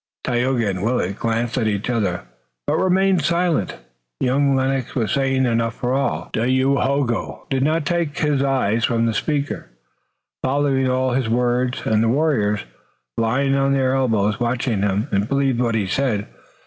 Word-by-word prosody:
Tayoga 125 -2 0
and 95 -2 -2
Willet 105 -3 -1
glanced 115 +2 -1
at 110 - 0
each 105 0 -1
other, 105 -8 -1 0.4
but - - +1
remained 190 -1 +2
silent. 170 - 0 0.4
Young 135 +2 +2
Lennox 130 -1 -1
was 110 -6 0
saying 135 -1 +1
enough 115 -1 0
for 125 0 -2
all 135 +1 -1
three. - - 0 0.2
Dayohogo 135 -2 0
did 135 -1 +1
not 155 +2 +1
take 170 -3 -1
his 150 -3 +1
eyes 130 -5 +1
from 115 -1 +1
the 115 - 0
speaker, 145 +5 -2 0.8
following 135 -1 +1
all 130 0 +1
his 125 -2 0
words, 125 +1 0
and 110 -1 +2
the 115 - +2
warriors, 120 -7 +1 0.5
lying 125 +5 +1
on 135 0 +2
their 130 -1 +1
elbows, 110 -6 +1
watched 120 +1 -1
him 105 -1 0
and 100 +2 0
believed 135 -3 +1
what 115 -2 +1
he 105 -3 0
said. 105 0 -1
125 Hz, 160 wpm, -21 LUFS, 115-140 Hz, 0.8 s, remained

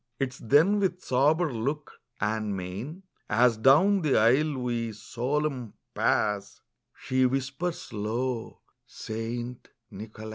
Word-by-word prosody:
Tis 130 -1 -2
then 160 - +4
with 185 -2 -1
sober 150 +4 +2
look, 140 +6 -4 0.2
and 105 -1 -1
mein, 105 - -6 0.3
As 120 -1 +4
down 155 - +5
the 150 -5 +2
aisle 135 +7 +3
we, 120 -3 -2
solemn, 125 +3 -3 0.2
pass, 105 -2 0 0.4
She 130 0 +1
whispers 135 +4 -3
low, 115 +3 -3 0.3
'St. 120 +2 -5 0.2
Nicholas. 110 +2 -9
125 Hz, 110 wpm, -27 LUFS, 110-150 Hz, 0.4 s, down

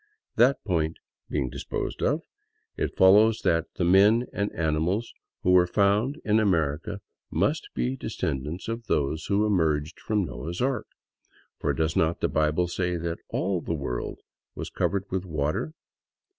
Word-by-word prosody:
That 125 +4 +4
point 80 -5 0 0.3
being 65 - 0
disposed - - -4
of, - - +1 0.5
it - - -3
follows 105 +4 +6
that 85 -2 +2
" - - -54
the - - 0
men 100 +7 +5
and 100 0 -1
animals 85 +8 0 0.3
who 90 - +3
were 90 -1 +6
found 105 - +2
in 110 0 +3
America 85 -1 0 0.3
must - - 0
be 65 +2 -1
descendants 75 +7 -3
of 115 0 -4
those 75 +3 0
who 100 +1 +2
emerged 80 -7 +1
from 105 -3 0
Noah's 85 +2 -6
ark; 130 -2 0 0.7
for - - 0
does 80 0 0
not 85 +1 +2
the - - +1
Bible 80 +3 +1
say 90 0 -1
that 85 0 -3
all 95 -1 -1
the 85 - -2
world 60 -5 -4 0.3
was - - -6
covered 100 -1 0
with 95 -1 -1
water? 75 - -2
90 Hz, 155 wpm, -26 LUFS, 80-105 Hz, 0.7 s, follows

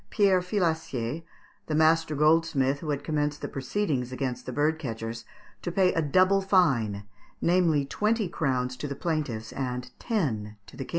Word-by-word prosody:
] - - -41
Pierre 195 -3 +3
Filacier, 160 - -1 0.5
the 155 - -1
master 160 0 +3
goldsmith 150 -3 +3
who 155 - -6
had 145 -1 -1
commenced 150 -1 -1
the - - -1
proceedings 135 -2 -2
against 130 -1 -4
the - - -3
bird 150 +4 +1
catchers, 115 -4 -5 0.4
to 175 - -3
pay 185 +1 +3
a 165 - +1
double 185 +6 +3
fine, 135 - +2 0.4
namely, 170 -5 +3
twenty 210 +7 0
crowns 130 -7 -1
to 145 - -5
the 140 - -4
plaintiffs 140 -11 -3
and 125 -1 -4
ten 110 - -2
to - - -14
the 135 0 -5
King. - - -18
150 Hz, 170 wpm, -27 LUFS, 125-170 Hz, 0.5 s, Pierre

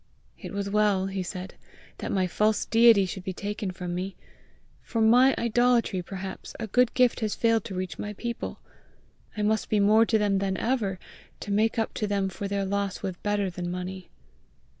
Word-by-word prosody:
"It - - -8
was 200 -1 -3
well," 205 -2 +2
he 195 0 -3
said, 185 +1 -6 0.5
"that - - -4
my 190 -2 +1
false 210 +4 +1
deity 230 -3 +6
should 185 0 -6
be 190 -1 -4
taken 205 +1 -4
from 180 -1 -5
me! 185 +2 -4 0.7
For 230 - -4
my 245 +4 +5
idolatry 235 -4 +2
perhaps, 190 +1 -7
a 230 - -2
good 245 +3 +2
gift 250 -2 +3
has 215 -3 -1
failed 230 -2 +2
to 190 - -6
reach 185 0 -4
my 210 - -4
people! 235 +3 -5 0.8
I 210 - -1
must 215 +1 +1
be 215 - +2
more 215 +3 +5
to 225 - +3
them 205 -2 +1
than 190 -1 -1
ever, 220 -7 -1 0.4
to 205 - -5
make 220 +3 +2
up 225 - -1
to 210 - -2
them 200 -1 0
for 200 +1 -5
their 200 0 -1
loss 200 0 -2
with 185 -2 -4
better 205 -2 0
than 175 0 -5
money!" 180 +1 -6
200 Hz, 190 wpm, -27 LUFS, 190-220 Hz, 0.8 s, deity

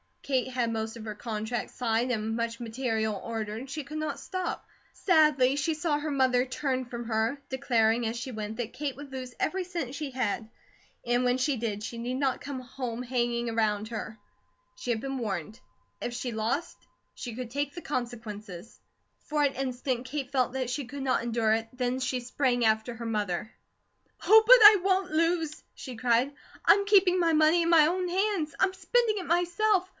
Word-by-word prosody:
Kate 260 -3 0
had 250 -3 -1
most 220 0 -3
of 230 - -8
her 215 -1 -5
contracts 220 +2 -4
signed 235 0 0
and 225 -1 -1
much 230 0 -2
material 225 -3 -2
ordered, 225 +2 -4
she 300 +2 -4
could 300 +3 -7
not 310 0 -3
stop. 370 -2 -4 0.3
Sadly 300 -7 +4
she 305 +3 +1
saw 310 -1 0
her 305 +1 -3
mother 260 -3 +2
turn 260 -1 -2
from 240 0 -6
her, 225 +3 0
declaring 235 -4 +2
as 225 - -2
she 250 +2 -5
went 215 -1 -5
that 240 -2 -3
Kate 285 -2 -3
would 285 0 -10
lose 255 -1 -7
every 375 0 -1
cent 340 -8 -4
she 290 0 -4
had, 230 -3 -2 0.6
and 245 +1 +1
when 250 0 +2
she 265 +1 +1
did 215 -2 -3
she 235 - -5
need 240 +2 -3
not 270 -1 0
come 280 -2 -5 0.4
hanging 240 -1 -1
around 215 -2 0
her. 220 -1 -6 0.6
She 375 - -7
had 225 -2 0
been 270 0 -3
warned. 210 -3 -4 0.4
If 240 - -3
she 245 0 -3
lost, 235 +10 -2 0.4
she 240 -3 -7
could 245 -1 -6
take 285 +1 -2
the 345 - -6
consequences. 220 - -6 0.5
For 300 -1 +1
an 280 -1 +2
instant 255 -1 -2
Kate 275 0 -4
felt 255 -2 +1
that 260 -2 -2
she 270 +2 -3
could 275 +2 -6
not 255 -3 +1
endure 230 -2 +1
it 225 0 -1
then 250 0 -1
she 255 -1 -1
sprang 245 0 0
after 220 +2 +1
her 235 0 -7
mother. 210 -2 -2 0.7
"Oh, 440 +2 +8
but - - +11
I 420 0 +11
won't 380 0 +1
lose!" 325 -1 0
she 255 -4 -8
cried. 245 +2 +2 0.3
"I'm 400 0 +5
keeping 380 -3 +5
my 335 -2 +3
money 310 +2 +5
in 335 - 0
my 325 -3 +7
own 360 +3 0
hands. 370 -4 0
I'm 380 0 +3
spending 440 +3 +1
it 370 - -5
myself. 360 +3 +2
255 Hz, 190 wpm, -28 LUFS, 230-300 Hz, 0.7 s, but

